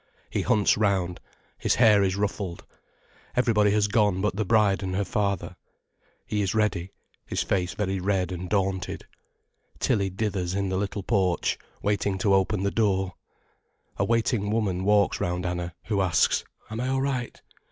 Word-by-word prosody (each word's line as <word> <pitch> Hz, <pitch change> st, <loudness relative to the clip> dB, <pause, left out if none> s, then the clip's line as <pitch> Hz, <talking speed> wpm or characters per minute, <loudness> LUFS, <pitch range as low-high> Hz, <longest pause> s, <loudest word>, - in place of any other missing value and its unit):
He -, -, 0 dB
hunts 105 Hz, -1 st, +3 dB
round—his 95 Hz, -4 st, -1 dB
hair 110 Hz, -4 st, +6 dB
is 95 Hz, -1 st, +1 dB
ruffled. 100 Hz, -3 st, -3 dB, 0.7 s
Everybody 110 Hz, -4 st, +3 dB
has 105 Hz, 0 st, +2 dB
gone 105 Hz, -3 st, +2 dB
but 105 Hz, 0 st, 0 dB
the 110 Hz, -, 0 dB
bride 105 Hz, -1 st, +3 dB
and 95 Hz, -1 st, -3 dB
her 100 Hz, +1 st, 0 dB
father. 100 Hz, -1 st, -1 dB, 0.7 s
He 105 Hz, -, -1 dB
is 100 Hz, +1 st, -1 dB
ready—his 100 Hz, -4 st, -2 dB
face 90 Hz, -2 st, -1 dB
very 95 Hz, -2 st, -1 dB
red 95 Hz, -1 st, 0 dB
and 90 Hz, 0 st, -5 dB
daunted. 95 Hz, -3 st, -1 dB, 0.7 s
Tilly 100 Hz, -2 st, +1 dB
dithers 95 Hz, -2 st, -2 dB
in 100 Hz, -1 st, -1 dB
the 95 Hz, -, -1 dB
little 100 Hz, 0 st, -3 dB
porch, 95 Hz, -5 st, +1 dB, 0.2 s
waiting 100 Hz, -1 st, 0 dB
to 100 Hz, +1 st, +2 dB
open 95 Hz, +1 st, +2 dB
the 100 Hz, -, +1 dB
door. 95 Hz, -4 st, +1 dB, 0.8 s
A -, -, +1 dB
waiting 115 Hz, -1 st, +1 dB
woman 100 Hz, -4 st, 0 dB
walks 105 Hz, -1 st, +3 dB
round 90 Hz, +1 st, -1 dB
Anna, 90 Hz, -1 st, -3 dB
who 105 Hz, -3 st, 0 dB
asks: 90 Hz, -3 st, +2 dB, 0.3 s
"Am 110 Hz, -, -4 dB
I 125 Hz, -, -1 dB
all 135 Hz, 0 st, 0 dB
right?" 130 Hz, -4 st, -2 dB
100 Hz, 155 wpm, -26 LUFS, 95-105 Hz, 0.8 s, hair